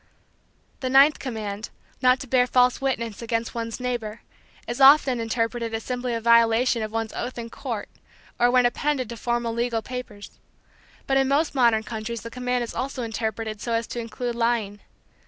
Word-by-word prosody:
The 260 - -2
ninth 275 +3 +6
command, 215 -4 -5 0.3
not 255 0 +4
to 270 - -7
bear 250 0 +3
false 250 0 +3
witness 235 -6 -2
against 230 0 -2
one's 230 0 -4
neighbor, 240 -3 -4 0.5
is 240 +3 -3
often 270 -2 +7
interpreted 230 0 -2
as 225 - -4
simply 250 -1 -3
a - - -1
violation 230 +1 +4
of 215 0 -4
one's 225 0 -3
oath 245 +1 -5
in 230 -1 -6
court, 235 -6 -5 0.5
or 240 - +5
when 250 0 +4
appended 255 0 0
to 235 - -6
formal 240 0 -1
legal 235 -1 -1
papers. 250 -5 -7 0.7
But 270 - +2
in 270 0 +3
most 285 +3 +1
modern 235 -5 +3
countries 220 +1 -5
the 230 - -7
command 250 0 -1
is 235 - -6
also 265 -1 -3
interpreted 220 -1 -4
so 235 - -2
as 230 0 0
to 240 - -4
include 235 +1 -4
lying. 230 -3 0
235 Hz, 175 wpm, -24 LUFS, 225-250 Hz, 0.7 s, often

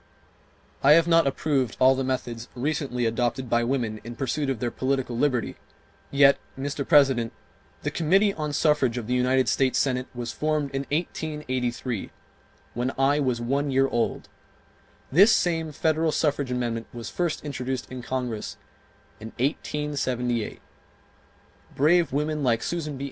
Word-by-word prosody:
I 140 +2 +7
have 165 +1 +5
not 165 -3 +4
approved 135 -4 0
all 130 +1 +6
the 135 0 -2
methods 120 -3 -3
recently 135 -2 -1
adopted 120 +2 -1
by 120 0 +3
women 115 -4 -1
in 120 +1 -8
pursuit 135 +3 -2
of 135 - -1
their 120 -1 -2
political 130 -2 -1
liberty; 125 -2 0 0.5
yet, 140 0 +5 0.2
Mr. 140 +1 -3
President, 135 -7 +4 0.5
the 150 - -1
Committee 195 +6 +3
on 150 -3 -3
Suffrage 145 -5 +2
of 120 - -4
the 125 - -2
United 130 +1 +2
States 130 -2 +2
Senate 130 -2 0
was 120 -1 -4
formed 155 -2 -1
in 135 0 -3
1883, 130 - -3 0.6
when 125 +2 -1
I 140 +2 +3
was 130 -4 0
one 140 +5 -1
year 135 0 +3
old; 120 -3 -1 0.8
this 195 - +7
same 165 -5 +1
federal 160 +2 +1
suffrage 145 -3 0
amendment 120 -2 -2
was 120 -2 -7
first 170 -3 -2
introduced 130 -3 -4
in 130 -1 -6
Congress 125 -3 -4 0.6
in 110 - -8
1878, 130 -4 -2 1.1
brave 165 +2 +3
women 150 +2 -1
like 115 -4 +1
Susan 155 -5 -3
B. - - -10
135 Hz, 145 wpm, -25 LUFS, 125-150 Hz, 1.1 s, I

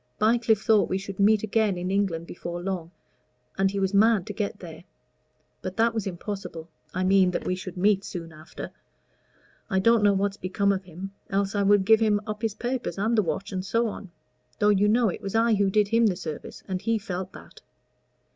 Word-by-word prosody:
Bycliffe 220 -1 +2
thought 215 -2 +3
we 190 - 0
should 195 0 -7
meet 210 +1 +4
again 215 -3 +1
in 180 +1 -3
England 190 -5 0
before 175 0 -6
long, 175 -2 -4 0.7
and 195 0 +2
he 200 +1 -3
was 190 0 0
mad 210 -2 +4
to - - -6
get 210 -2 -3
there. 165 -2 -10 0.8
But 185 +2 -6
that 230 +1 +3
was 220 -3 -2
impossible 180 -3 -6 0.2
I 185 - -2
mean 190 0 +4
that 180 - -3
we - - 0
should 185 0 -7
meet 200 +1 +3
soon 165 -4 -7
after. 155 +1 -9 1.0
I 190 - 0
don't 230 +4 +4
know 205 -1 +5
what's 200 +1 0
become 200 +2 0
of 190 -1 -2
him, 185 +3 -8 0.2
else 195 0 0
I 205 - +1
would 200 -1 +4
give 220 +1 +6
him 215 -2 +3
up 215 0 -5
his 225 -3 -1
papers 245 0 -3
and 220 +4 +1
the 215 - +4
watch, 195 +3 -3
and 185 -1 -3
so 230 +4 +1
on 200 -2 -8 0.5
though, 210 - +3
you 205 0 +4
know, 225 +1 +3
it - - -5
was 195 +2 -5
I 230 0 +4
who 200 -2 +2
did 205 +1 +2
him 230 0 +4
the 190 - +1
service, 160 -4 -7
and 185 -1 -3
he 225 +1 +1
felt 185 -2 -5
that." - - -14
200 Hz, 210 wpm, -26 LUFS, 185-215 Hz, 1.0 s, give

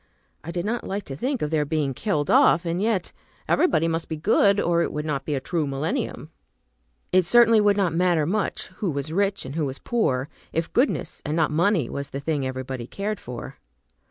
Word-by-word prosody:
I 170 - -8
did 175 +1 -3
not 235 +3 -2
like 200 +1 -3
to 135 - -7
think 255 - -2
of 150 - -2
their 155 -2 +2
being 145 -2 -1
killed 150 - -1
off, 170 - +5
and 170 +2 -1
yet 210 -4 0 0.4
everybody 165 - +3
must 165 0 -2
be 160 - -3
good, 200 +4 +3
or 170 -2 +2
it - - -1
would 150 0 -4
not 140 -3 -2
be 150 - -1
a - - 0
true 155 +2 -2
millennium. 155 - -3 0.8
It 185 -2 +3
certainly 230 0 +6
would 205 -1 +3
not 185 -5 +1
matter 170 -2 +2
much 200 +5 -1 0.2
who 200 - +1
was 145 +1 -3
rich, 200 -1 0
and 130 - -6
who 155 -1 -1
was 135 +1 -5
poor, 140 - 0 0.2
if 165 +1 -2
goodness, 260 +4 0
and 150 0 -2
not 160 -2 +2
money, 165 - +2
was 140 +2 -5
the 140 - -5
thing 140 -2 -1
everybody 130 -2 -5
cared 205 +5 -3
for. 120 -1 -8
165 Hz, 210 wpm, -24 LUFS, 145-200 Hz, 0.8 s, certainly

